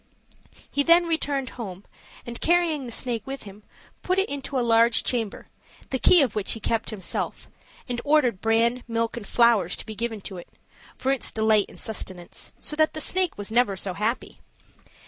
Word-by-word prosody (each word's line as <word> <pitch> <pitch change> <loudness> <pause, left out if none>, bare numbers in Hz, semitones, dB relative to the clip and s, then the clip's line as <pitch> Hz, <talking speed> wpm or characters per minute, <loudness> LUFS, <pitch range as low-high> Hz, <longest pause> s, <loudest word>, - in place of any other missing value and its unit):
He 285 - +2
then 340 +3 +6
returned 285 -5 -1
home, 195 -2 -7 0.4
and 235 0 -7
carrying 330 -5 +2
the - - -7
snake 235 -1 -1
with 270 0 -5
him, 205 0 -12 0.4
put 370 +1 0
it 385 - +2
into 280 -1 -4
a 245 - +1
large 230 0 +4
chamber, 230 -5 -2 0.4
the 260 - 0
key 355 +2 +6
of 245 -6 -1
which 210 -2 0
he 225 - -6
kept 225 +1 -1
himself, 200 -5 -3 0.4
and 245 -2 -3
ordered 285 -9 +3
bran, 230 +2 +2
milk, 230 0 -1
and 225 -4 -7
flowers 230 -7 +3
to - - -8
be 220 - -6
given 225 0 -3
to 190 -1 -7
it, 175 - -10 0.5
for 265 - 0
its 270 - -1
delight 220 -2 +3
and - - -14
sustenance; 185 -5 -6
so 300 - -4
that 310 0 +3 0.2
never 370 -1 +2
was 205 -1 -5
snake 225 -4 +2
so 190 -1 -2
happy. 215 +6 -2
235 Hz, 185 wpm, -25 LUFS, 215-275 Hz, 0.5 s, then